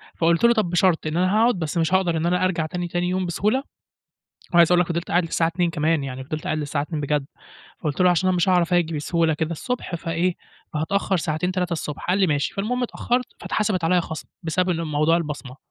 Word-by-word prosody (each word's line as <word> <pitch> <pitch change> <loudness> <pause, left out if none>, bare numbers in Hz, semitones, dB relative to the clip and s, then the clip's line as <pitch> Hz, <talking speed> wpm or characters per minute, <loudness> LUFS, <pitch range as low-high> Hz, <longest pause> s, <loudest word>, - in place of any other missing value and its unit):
فقُلت 170 +4 +2
له: 235 0 +6
"طب 215 -7 0
بشرط، 175 -2 +2
إن 155 +2 -2
أنا 185 +3 +2
هاقعد 230 0 +4
بس 160 +1 -3
مش 165 +2 +1
هاقدر 175 -3 +2
إن 160 - -1
أنا 180 +1 +2
أرجع 165 -4 0
تاني 175 +2 -4
تاني 175 +1 -1
يوم 185 0 -1
بسهولة" 210 - 0 0.9
عايز 170 0 +6
أقول 175 - +5
لك 180 - +1
فضلت 170 0 -3
قاعد 175 0 +3
للساعة 165 0 +1
02:00 170 0 0
كمان 155 -1 0
يعني 130 0 -6
فضلت 155 +2 -5
قاعد 155 - -1
للساعة 145 -1 -2
02:00 155 0 -4
بجد، 145 -1 -1 0.5
فقُلت 150 0 -3
له: 180 - +6
"عشان 180 +2 +2
أنا 185 - +2
مش 175 +2 +1
هاعرف 180 -1 +3
آجي 165 -2 +1
بسهولة 160 +1 +1
كده 160 +1 -2
الصبح 240 +1 -4
فإيه، 170 +2 -1 0.4
هاتأخر 190 +5 0
ساعتين، 160 +3 -1
3 180 -1 -1
الصبح." 150 -2 -4
قال 185 +2 +2
لي: 190 - +4
"ماشي" 145 -2 0
فالمهم 245 +6 -1
اتأخرت 245 +1 -1
فاتحسبت 200 -5 -1
عليَّ 180 +2 +3
خصم 160 -2 -7
بسبب 180 +3 0
ان 165 -1 -1
موضوع 155 +1 +2
البصمة. 145 -5 -5
170 Hz, 220 wpm, -23 LUFS, 155-185 Hz, 0.9 s, له